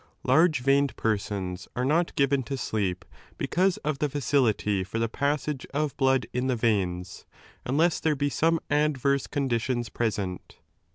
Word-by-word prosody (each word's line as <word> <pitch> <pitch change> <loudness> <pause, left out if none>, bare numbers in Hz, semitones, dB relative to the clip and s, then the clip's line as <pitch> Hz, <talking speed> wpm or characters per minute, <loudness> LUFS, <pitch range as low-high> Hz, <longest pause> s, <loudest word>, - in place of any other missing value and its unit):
Large 160 -5 +4
veined 140 +1 +2
persons 100 -4 -2
are 125 - 0
not 165 +5 +2
17 - - -15
given 140 -2 +2
to 135 +1 -3
sleep 100 -7 -2 0.3
because 185 +1 +1
of 150 -2 -1
the 150 - 0
facility 120 -8 +1
for 95 +4 -5
the 115 0 +1
passage 140 +2 -1
of 150 -1 0
blood 135 -1 +3
^ - - -11
in 125 +1 0
the 130 - +1
veins, 95 -5 -1 0.4
unless 155 +6 +2
there 155 -2 +1
be 145 +1 0
some 165 +3 +2
adverse 140 -2 +1
con 140 -2 -1
ditions 120 -2 -1
present. 100 -5 -3
130 Hz, 165 wpm, -27 LUFS, 110-145 Hz, 0.4 s, Large